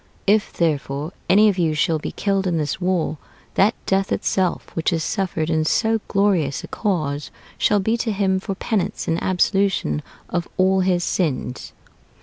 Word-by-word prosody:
If, 205 +1 +3
therefore, 150 -1 -1 0.2
any 210 +3 +6
of 195 -3 +1
you 160 -3 +1
shall 155 +1 +1
be - - -5
killed 195 -2 0
in 170 -2 +1
this 150 +3 -2
war, 175 -4 0 0.3
that 205 +4 +3
death 195 0 +1
itself, 185 -2 -1
which 165 - +1
is 165 -2 0
suffered 175 -5 -1
in 160 -1 +1
so 220 +7 +1
glorious 185 -9 +1
a - - -7
cause, 155 -8 -2 0.3
shall 205 - +3
be 220 +4 +1
to 230 -1 -1
him 190 -2 +1
for 195 0 -4
penance 205 0 -2
and 165 +1 0
absolution 185 - +1 0.3
of 175 -1 -2
all 190 +1 +3
his 180 -1 +2
sins." 135 -9 -2
185 Hz, 165 wpm, -22 LUFS, 160-195 Hz, 0.3 s, any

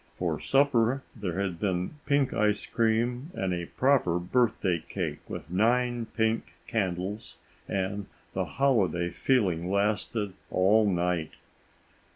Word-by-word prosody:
For - - -1
supper 135 -2 +2
there 95 -5 -3
had 95 -4 -2
been 95 +8 -2
pink 140 -2 +2
ice 105 -1 +1
cream 120 +5 0
and 95 -1 -1
a 85 -1 -3
proper 130 -11 +2
birthday 95 -2 +1
cake - - -3
with 85 - -7
nine 120 +4 +2
pink 110 -1 -1
candles, 100 -1 -3 0.3
and 100 +1 -2 0.3
the - - -1
holiday 95 - +1
feeling 90 -10 +1
lasted 105 0 0 0.2
all 105 +3 +4
night. 90 -3 0
105 Hz, 120 wpm, -28 LUFS, 90-120 Hz, 0.3 s, all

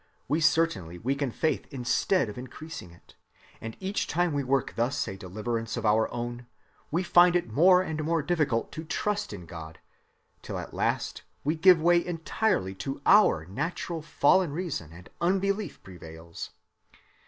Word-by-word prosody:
We 150 +5 +1
certainly 115 - +1
weaken 135 +7 -1
faith 155 +6 -1
instead 135 - +1
of 105 - -7
increasing 130 - -8
it; 85 0 -19 0.5
and 115 0 -7
each 195 +1 -2
time 175 -1 +1
we 140 -1 0
work 135 0 0
thus 120 +4 0
a 95 - -5
deliverance 110 +5 -4
of - - -3
our 110 +1 +3
own 120 0 -5 0.4
we 170 +5 0
find 175 0 +5
it 145 -11 -1
more 180 +6 +6
and 155 -3 -3
more 165 0 0
difficult 145 -7 0
to 160 - -6
trust 205 +5 -2
in 95 -4 -8
God, 80 -1 -9 0.6
till - - -5
at - - -7
last - - -1 0.2
we 150 +3 +1
give 180 +1 +6
way 170 +1 +4
entirely 165 - -1
to 135 0 -4
our 200 - +5
natural 160 - -3
fallen 155 +2 +3
reason 155 - -4
and 90 +2 -13
unbelief 195 0 0
prevails. 85 -2 -9
145 Hz, 155 wpm, -28 LUFS, 110-175 Hz, 0.6 s, more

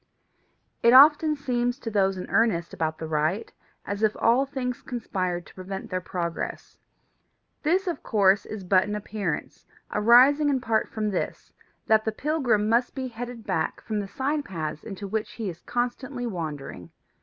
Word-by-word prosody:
It 235 +1 +5
often 300 +3 +7
seems 245 -3 -1
to 230 -6 -6
those 195 -2 +2
in 180 - -6
earnest 200 -7 +2
about 155 -1 -2
the 160 - -5
right 155 +7 -1 0.3
as 200 +1 -4
if 215 -1 +2
all 250 +4 +3
things 250 -3 -4
conspired 185 -8 -3
to - - -16
prevent 190 +1 -7
their 185 0 -1
progress. 170 -2 -5 0.8
This 360 +6 +2
of 350 -3 -3
course 200 -1 +3
is 215 -3 -6
but 185 0 +3
an 210 - -3
appearance, 205 -5 -4 0.2
arising 255 +7 +6
in 270 -2 +2
part 225 -3 0
from 215 -1 -2
this, 185 - -4 0.3
that 220 0 +4
the 220 - -1
pilgrim 250 -5 +1
must 235 +3 +1
be 260 -2 -3
headed 240 -1 -7
back 175 -6 -1
from 215 -1 -3
the 200 - -4
side 285 +7 -1
paths 155 - -5
into 200 -1 -7
which 215 +2 -3
he 220 -4 -4
is 170 - -14
constantly 245 +1 -3
wandering. 155 - -5
220 Hz, 165 wpm, -26 LUFS, 185-250 Hz, 0.8 s, often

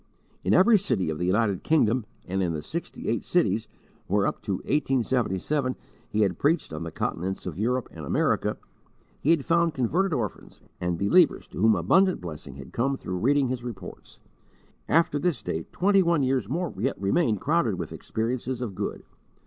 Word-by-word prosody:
In - - +1
every 210 +4 +6
city 100 - 0
of 75 - -5
the 90 - 0
United 100 -1 +1
Kingdom 125 -7 +2 0.2
and 95 +1 -1
in 85 -3 0
the 75 -1 -4
"sixty - - -5
eight - - 0
cities" - - +1 0.4
where, 100 +1 +2
up - - -2
to 100 - -2
1877, 130 +1 0 0.3
he 110 - 0
had 95 -4 +1
preached 155 - +1
on 75 - -5
the 85 - -4
continents 95 +4 -3
of - - -5
Europe 125 +3 0
and 80 - -9
America, 70 - +1 0.6
he 145 - -1
had 165 -5 +3
found 170 -1 +2
converted 170 - +1
orphans, 120 -9 -4 0.2
and 90 -1 -1
believers 150 - +3
to - - -8
whom 110 +2 +5
abundant 190 0 +3
blessing 80 -6 -8
had 70 -1 -11
come 135 +3 0
through 90 -6 -4
reading 135 +4 +2
his 125 -1 -3
reports. 100 -7 -9 0.7
After 160 -3 +3
this 150 -10 -1
date, 80 0 -4
twenty 195 +2 +3
one 170 -5 +2
years 130 -5 0
more 170 +3 -2
yet 130 +6 -1
remained 105 - +1
crowded 150 - +1
with 85 -3 -5
experiences 120 +3 -3
of 120 -5 -4
good. 100 +2 -4
120 Hz, 180 wpm, -26 LUFS, 95-150 Hz, 0.7 s, every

